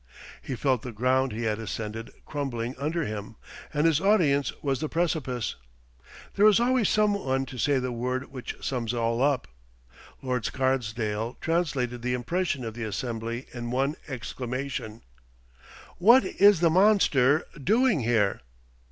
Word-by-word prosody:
He 130 - -5
felt 130 -2 +1
the 125 - -6
ground 130 +4 +1
he 115 +2 -4
had 110 -1 -1
ascended 110 +2 -5 0.2
crumbling 130 -4 -3
under 155 +3 -1
him, 110 0 -6 0.4
and 150 +1 +1
his 160 -2 +3
audience 160 -9 +3
was 135 -3 0
the 155 - -2
precipice. 155 -8 -1 0.8
There 205 +2 +5
is 210 -1 +5
always 245 -2 +2
some 210 -1 +3
one 135 -9 -1
to 130 -1 -9
say 140 +4 +2
the 130 -1 -2
word 125 +3 -3
which 130 -3 -6
sums 120 -3 -2
all 115 0 0
up. 140 -1 +1 0.8
Lord 125 -3 -1
Scarsdale 115 -3 -1
translated 140 -8 -1
the 125 +1 0
impression 140 +1 -2
of 110 - -5
the 120 +1 -6
assembly 115 +2 -4
in 120 -1 -5
one 135 +4 0
exclamation, 125 -2 -5 1.0
"What 235 +8 +6
is 200 -4 +4
the 165 -2 +4
monster 160 -7 +4 0.2
doing 225 - +3
here?" 110 -4 +1
130 Hz, 145 wpm, -27 LUFS, 120-155 Hz, 1.0 s, What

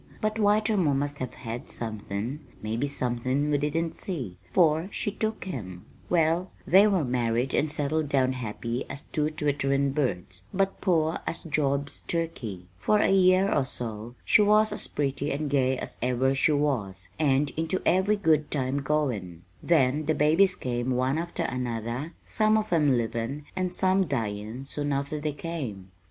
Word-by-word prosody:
But 215 0 -1
Whitermore 205 -7 +3
must 145 +1 -2
have 130 -2 -5
had 115 0 -6
somethin' 110 +3 -4 0.2
maybe 115 +6 -2
somethin' 130 +2 -1
we 145 - +2
didn't 160 +3 -1
see, 125 - -5
for 160 - +3
she 205 - -2
took 220 +2 -3
him. 95 - -6 0.2
"Well, 170 +2 +2 0.2
they 195 +4 +6
married 125 - +1
and 150 0 +1
settled 150 0 -1
down 130 -2 +2
happy 115 0 -4
as 140 +2 -6
two 150 0 -1
twitterin' 140 -2 0
birds, 95 -10 -2
but 195 0 0
poor 165 -4 +2
as 165 - -3
Job's 140 -2 0
turkey. 125 - -3
For 210 - +3
a 205 - +3
year 190 +1 +4
or 140 - +3
so 120 -2 -6
she - - +5
was 210 +1 +4
as - - -4
pretty 140 0 -2
and 145 0 -2
gay 130 -2 +2
as - - -5
ever 130 +2 +2
she 135 +3 +3
was 105 - -1
and 140 -1 +2
into 165 +4 -1
every 190 +4 +3
good 160 -7 +2
time 135 0 -1
goin'; 120 - -1 0.2
then 150 -2 +2
the 155 - +2
babies 165 +6 +4
came, 120 0 -2
one 130 +4 +1
after 170 0 -3
another, 125 +3 -3
some 215 0 +2
of 215 -3 -1
'em 145 -6 +4
livin' 115 +5 -2
and 185 -1 -1
some 185 +1 +2
dyin' 110 -1 -3
soon 145 +1 -2
after 140 +2 -2
they 150 0 -1
came. 135 - -6
145 Hz, 160 wpm, -27 LUFS, 125-165 Hz, 0.2 s, they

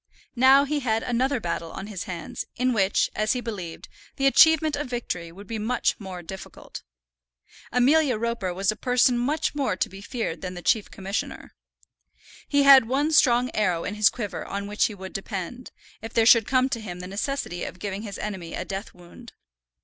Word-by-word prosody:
Now 265 +3 +6
he 295 +1 -1
had 225 -4 0
another 255 +2 0
battle 170 -3 -4
on 195 - -7
his 205 -4 -6
hands, 170 -3 -6
in 255 +1 +1
which, 195 -3 +2
as 215 +1 +1
he 250 - -2
believed, 195 -9 -6 0.3
the 275 - -1
achievement 315 +2 +5
of 285 -2 -4
victory 180 -9 -4
would 195 +4 -12
be 220 +1 -5
much 225 +4 0
more 185 -4 -8
difficult. 190 +3 -9 0.9
Amelia 260 +1 +3
Roper 235 -4 -2
was 195 +3 0
a - - -6
person 250 +2 +2
much 285 +6 0
more 275 -9 -1
to - - -1
be 195 +1 -11
feared 205 -8 -4
than 185 -1 -5
the 175 - -8
Chief 215 -3 +2
Commissioner. 195 +1 -5 0.9
He 285 -1 +3
had 270 -4 +8
one 285 +5 +1
strong 250 -5 +4
arrow 180 -6 0
in - - -3
his 210 0 +4
quiver 205 -6 -5
on 200 0 -5
which 210 +1 +1
he 215 - -3
would 190 -1 -9
depend, 195 +5 -5 0.3
if 225 - -8
there 225 - +4
should 230 -1 +6
come 255 +1 +3
to 235 -4 -3
him 180 -4 -7
the 180 - -7
necessity 200 -2 -3
of - - -6
giving 195 +1 -4
his 205 -3 -7
enemy 190 -6 -5
a 185 - -4
death 195 +3 -6
wound. 180 +7 -14
220 Hz, 195 wpm, -25 LUFS, 190-255 Hz, 0.9 s, had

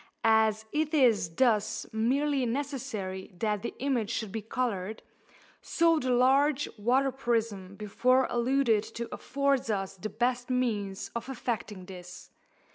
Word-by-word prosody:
As 220 -1 +3
it 310 +1 0
is 235 - +4
thus 225 -5 +2
merely 270 +5 +1
necessary 230 -8 -4
that 210 0 -1
the 235 - -5
image 250 -6 0
should 220 -4 -3
be 220 +1 -3
coloured, 220 -3 -3 0.6
so 330 -1 +3
the 255 - -2
large 270 +3 +3
water 255 +6 +2
prism 225 -7 -2
before 250 +5 +2
alluded 240 -3 +2
to 235 0 -3
affords 280 -3 0
us 195 -3 -2
the 215 +4 -5
best 245 +2 -1
means 215 -6 -1
of 235 +3 -4
effecting 220 -6 -4
this. 180 -1 -11
235 Hz, 130 wpm, -29 LUFS, 210-265 Hz, 0.6 s, is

